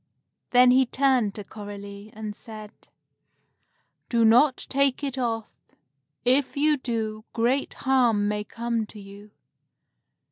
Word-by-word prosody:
Then 250 0 +6
he 260 0 +4
turned 255 -6 +1
to 210 - -6
Coralie, 205 0 -9
and 215 -1 -6
said, 215 -2 -10 1.4
"Do 230 -2 +3
not 250 +5 +4
take 275 0 +1
it 275 -2 -2
off. 230 -4 -3 0.7
If 265 +3 +2
you 300 +1 +3
do, 220 -4 -4
great 245 +4 0
harm 240 -6 +3
may 210 0 -1
come 230 0 -3
to 210 - -12
you. 200 +1 -13
230 Hz, 120 wpm, -25 LUFS, 210-260 Hz, 1.4 s, Then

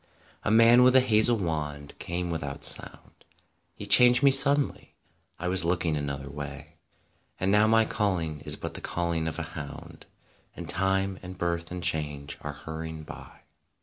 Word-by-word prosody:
22 - - -7
A - - +1
man 115 +2 +6
with 125 +1 +4
a - - +8
hazel 115 -1 +2
wand 75 -6 -5
came 90 0 -4
without 70 -4 -6
sound; - - -2 0.5
He 105 - -8
changed 125 +5 +5
me 140 - +6
suddenly; 140 +1 +5 0.4
I 90 - -5
was 90 -1 +2
looking 85 -2 -1
an 70 -1 -3
other 70 0 -7
way; 70 0 -9 0.6
And 95 +1 0
now 105 +1 +4
my 115 0 +3
calling 90 -9 -2
is - - +3
but - - -7
the - - -4
calling 85 -2 -3
of 80 - -5
a - - -4
hound; 70 -2 -10 0.5
And - - -9
Time 95 +1 -1
and 90 0 -10
Birth 85 -1 -3
and 90 -1 -7
Change 75 -2 -2
are 75 - -6
hurry 80 +2 -8
ing 80 -1 -9
by. - - -13
85 Hz, 180 wpm, -26 LUFS, 75-105 Hz, 0.6 s, a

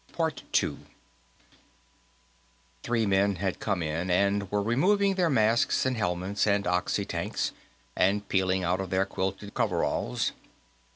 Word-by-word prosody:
Three 115 - 0
men 100 0 +2
had 95 +1 -2
come 100 -5 -1
in, 80 +4 -2
and 100 +2 +1
were 105 -1 +1
removing 195 - +2
their 180 -3 +1
masks 115 -3 +2
and 130 -1 +1
helmets 95 0 -1
and 100 -1 +2
oxy 90 0 0
tanks, - - -2 0.4
and 100 +2 +1
peeling 95 -1 +1
out 90 +2 0
of 95 - -5
their 95 +1 +1
quilted 95 +2 -4
coveralls. 90 - 0
100 Hz, 120 wpm, -28 LUFS, 95-110 Hz, 0.4 s, men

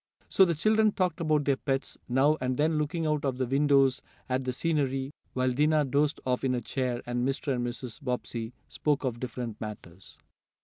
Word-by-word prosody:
So 190 - +6
the 170 -2 0
children 215 +5 +3
talked 180 -2 0
about 155 -3 +2
their 140 -2 +2
pets, 135 0 -2
now 135 +5 +4
and 130 0 -1
then 155 +1 +2
looking 160 +2 -1
out 150 -1 0
of 135 -3 -1
the 130 - 0
windows 135 0 +3 0.3
at 130 +1 0
the 130 - 0
scenery, 135 -2 -1 0.2
while 130 0 +1
Dinah 150 +3 +3
dozed 145 +3 +1
off 125 0 0
in 130 -1 +2
her 125 - 0
chair, 125 0 -2
and 120 0 -1
Mr. 135 +2 0
and 120 -1 -1
Mrs. 120 +1 -7
Bobbsey 125 -3 -3 0.2
spoke 150 -2 0
of 120 -3 -2
different 120 -3 -5
matters. 95 -5 -9
135 Hz, 190 wpm, -29 LUFS, 125-150 Hz, 0.3 s, So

